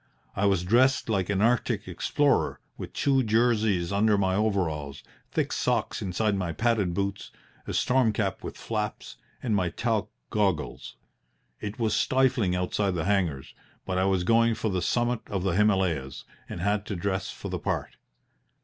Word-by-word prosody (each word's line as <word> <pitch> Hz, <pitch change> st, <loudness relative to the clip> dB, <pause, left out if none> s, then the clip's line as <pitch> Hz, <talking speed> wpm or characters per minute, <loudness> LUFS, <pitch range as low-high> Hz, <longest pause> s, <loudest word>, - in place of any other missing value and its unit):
I 100 Hz, +1 st, +2 dB
was 95 Hz, -3 st, +2 dB
dressed 130 Hz, +6 st, +3 dB
like 95 Hz, -4 st, 0 dB
an 100 Hz, 0 st, +1 dB
Arctic 120 Hz, +1 st, +1 dB
explorer, -, -, +1 dB, 0.2 s
with -, -, -7 dB
two 135 Hz, -2 st, +2 dB
jerseys 110 Hz, -6 st, +2 dB
under 105 Hz, +1 st, +3 dB
my 95 Hz, -1 st, +1 dB
overalls, 85 Hz, -9 st, -1 dB, 0.3 s
thick -, -, -1 dB
socks -, -, 0 dB
inside 100 Hz, +3 st, 0 dB
my 90 Hz, -4 st, -2 dB
padded 110 Hz, -4 st, +1 dB
boots, 100 Hz, 0 st, -2 dB, 0.4 s
a -, -, -3 dB
storm 125 Hz, -3 st, +3 dB
cap 100 Hz, -2 st, -2 dB
with -, -, -6 dB
flaps, 105 Hz, -2 st, -4 dB, 0.3 s
and 115 Hz, -5 st, +1 dB
my 90 Hz, -3 st, +1 dB
talc -, -, -1 dB, 0.2 s
goggles. 95 Hz, -8 st, -1 dB, 0.6 s
It 105 Hz, 0 st, -5 dB
was 110 Hz, -3 st, 0 dB
stifling 125 Hz, -8 st, +2 dB
outside 90 Hz, +1 st, 0 dB
the 80 Hz, -, -2 dB
hangars, 90 Hz, -9 st, 0 dB, 0.3 s
but 95 Hz, -1 st, -1 dB
I 95 Hz, -, +2 dB
was 95 Hz, -2 st, +1 dB
going 115 Hz, +3 st, +3 dB
for 110 Hz, -1 st, -2 dB
the 90 Hz, -1 st, -1 dB
summit 120 Hz, +5 st, +1 dB
of 95 Hz, -3 st, -2 dB
the 95 Hz, -, +1 dB
Himalayas, 95 Hz, -10 st, +1 dB, 0.3 s
and -, -, -5 dB
had 105 Hz, +2 st, 0 dB
to 100 Hz, -, -3 dB
dress 95 Hz, +1 st, -2 dB
for -, -, -7 dB
the -, -, -3 dB
part. -, -, -3 dB
100 Hz, 165 wpm, -27 LUFS, 90-110 Hz, 0.6 s, dressed